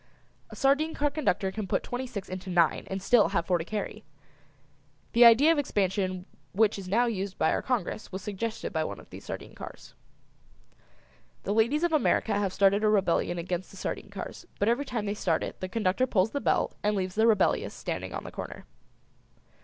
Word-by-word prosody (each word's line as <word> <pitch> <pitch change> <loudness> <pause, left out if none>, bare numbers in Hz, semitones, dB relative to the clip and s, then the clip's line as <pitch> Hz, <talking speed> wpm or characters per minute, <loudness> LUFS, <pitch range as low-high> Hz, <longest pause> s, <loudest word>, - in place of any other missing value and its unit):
A - - -10
sardine 285 +4 +2
car 290 0 +1
conductor 195 - 0
can 210 0 -4
put - - 0
twenty 250 +1 -4
six 210 -6 -6
into 185 +1 -6
nine 170 -3 +2
and 190 - -3
still 235 +1 +5
have 170 - 0
four 175 -1 +1
to - - -2
carry. 215 +3 -5 1.1
The 235 +1 +7
idea 245 +8 +7
of 325 - +2
expansion 190 -7 -1 0.3
which 215 0 +2
is 190 - -8
now 230 +6 +3
used 200 -4 -3
by 160 - +2
our - - 0
Congress 245 -3 -2
was 190 0 -6
suggested 215 +2 -4
by - - +1
one - - -5
of - - -16
these - - -10
sardine - - -7
cars. - - -10 1.5
The 200 - -1
ladies 235 +9 +2
of 345 -2 +1
America 285 -6 +2
have 200 -2 0
started 200 +2 +3
a 215 - +4
rebellion 185 -3 +2
against 175 +1 -3
the 195 - -13
sardine 200 - -4
cars, 200 -1 -8
but 205 - +1
every 240 +5 +2
time 235 -5 -3
they 205 - -1
start 175 -5 0
it - - -6
the 185 - -4
conductor 220 +4 +1
pulls 205 -1 +2
the 285 - -2
bell - - +1
and 210 0 +1
leaves 185 -2 -2
the 220 +3 +3
rebellious 215 -4 +2
standing - - -4
on - - -5
the - - -8
corner. - - -7
205 Hz, 200 wpm, -28 LUFS, 185-235 Hz, 1.5 s, The